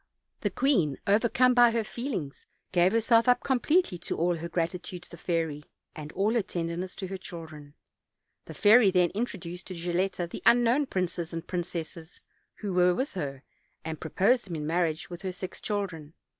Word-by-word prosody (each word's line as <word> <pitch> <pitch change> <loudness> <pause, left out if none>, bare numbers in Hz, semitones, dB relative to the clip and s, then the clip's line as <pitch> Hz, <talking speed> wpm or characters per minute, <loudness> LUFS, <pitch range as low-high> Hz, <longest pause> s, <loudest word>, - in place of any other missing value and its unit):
The - - 0
queen, 185 - +1
overcome 235 +5 +4
by 245 -1 +7
her 230 -1 0
feelings, 210 - -5 0.2
gave 180 +1 +4
herself 230 +1 +3
up 245 - +4
completely 270 - +2
to - - -4
all 175 +1 +1
her 170 +1 -6
gratitude 175 +1 -3
to - - -15
the - - -8
fairy, 160 -4 -2 0.3
and 150 -1 -7
all 205 +4 +1
her 235 - +3
tenderness 175 0 -4
to 190 - -5
her 190 - -4
children. 155 -5 -10 0.7
The - - -9
fairy 220 0 +6
then 180 -2 +3
introduced 180 -5 -5
to 185 - -6
Gilletta 175 +1 -1
the - - -8
unknown 245 +4 +4
princes 175 -4 -2
and 165 0 -5
princesses, 170 -2 -6 0.3
who 205 -3 -4
were 180 0 +4
with 265 +7 -2
her, 140 -7 -5 0.4
and 160 -1 -4
proposed 220 +10 +2
them 175 -4 -6
in 150 -1 -4
marriage 165 0 -1
with 175 - -7
her 190 - -3
six 180 +1 -7
children. 180 -7 -4
180 Hz, 175 wpm, -28 LUFS, 165-215 Hz, 0.7 s, by